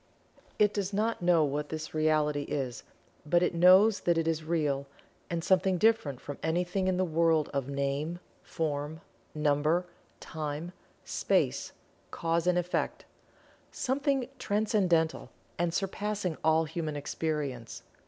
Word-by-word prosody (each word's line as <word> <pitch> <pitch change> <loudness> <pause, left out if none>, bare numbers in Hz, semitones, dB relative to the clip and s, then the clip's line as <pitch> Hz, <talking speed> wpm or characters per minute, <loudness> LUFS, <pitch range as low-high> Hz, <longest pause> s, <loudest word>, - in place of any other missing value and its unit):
It 210 -1 +4
does 200 -1 -2
not 220 +2 0
know 175 -2 +4
what 145 +1 -2
this 155 -1 -5
Reality 155 -2 +2
is, 130 -5 -3 0.4
but 175 +4 +2
it 180 - +1
knows 185 +5 +6
that 170 -1 +1
it 165 0 0
is 160 -1 0
Real, 150 -4 -1 0.4
and 170 -1 -2
something 190 0 +3
different 215 - +2
from 145 0 -8
anything 180 +3 0
in 185 -1 +1
the 185 - +2
world 165 -2 +2
of 140 -1 -2
name, 140 +4 -2 0.2
form, 155 -1 -3 0.3
number, 150 +3 +2 0.3
time, 155 +2 -5 0.3
space, - - 0 0.4
cause 165 +1 -1
and 180 0 +3
effect 180 0 -2 0.7
something 270 -1 0
Transcendental 195 -6 +1 0.3
and 175 -1 +1
surpassing 195 -1 -2
all 160 +1 +4
human 155 -1 -4
experience. 145 -5 -3
165 Hz, 130 wpm, -30 LUFS, 150-185 Hz, 0.7 s, knows